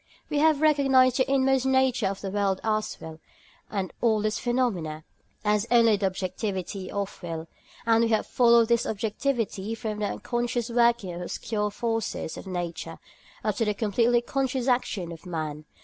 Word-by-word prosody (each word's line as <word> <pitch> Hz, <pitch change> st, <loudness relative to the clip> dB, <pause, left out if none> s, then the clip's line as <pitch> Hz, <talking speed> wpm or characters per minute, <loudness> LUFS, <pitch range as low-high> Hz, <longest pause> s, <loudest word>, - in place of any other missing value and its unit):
We 295 Hz, -, +1 dB
have 310 Hz, -1 st, +4 dB
recognised 270 Hz, -4 st, +4 dB
the 265 Hz, 0 st, +1 dB
inmost 270 Hz, -1 st, +3 dB
nature 260 Hz, -4 st, +2 dB
of 195 Hz, 0 st, -4 dB
the 195 Hz, -, -4 dB
world 200 Hz, -1 st, 0 dB
as 215 Hz, -1 st, -1 dB
will, 160 Hz, 0 st, -9 dB, 0.5 s
and 195 Hz, -3 st, -3 dB
all 220 Hz, -3 st, +2 dB
its 215 Hz, -1 st, 0 dB
phenomena 200 Hz, -12 st, -1 dB, 0.4 s
as 210 Hz, +1 st, +2 dB
only 230 Hz, -3 st, +5 dB
the 200 Hz, -1 st, +1 dB
objectivity 190 Hz, 0 st, -4 dB
of 200 Hz, -1 st, -4 dB
will; 165 Hz, -2 st, -5 dB, 0.4 s
and 230 Hz, 0 st, +4 dB
we -, -, 0 dB
have 220 Hz, -1 st, +2 dB
followed 235 Hz, -2 st, +4 dB
this 235 Hz, -1 st, +2 dB
objectivity 220 Hz, -1 st, -2 dB
from 220 Hz, -2 st, -4 dB
the 210 Hz, -, 0 dB
unconscious 240 Hz, 0 st, -2 dB
working 235 Hz, -5 st, +2 dB
of 175 Hz, -, -6 dB
obscure 210 Hz, +4 st, -2 dB
forces 225 Hz, -5 st, -3 dB
of -, -, -9 dB
Nature 175 Hz, -2 st, -4 dB, 0.5 s
up -, -, -1 dB
to 230 Hz, -, +1 dB
the 210 Hz, -1 st, 0 dB
completely 230 Hz, +3 st, +2 dB
conscious 260 Hz, 0 st, -1 dB
action 210 Hz, -8 st, 0 dB
of 165 Hz, +2 st, -10 dB
man. 155 Hz, -3 st, -4 dB
220 Hz, 165 wpm, -26 LUFS, 190-240 Hz, 0.5 s, only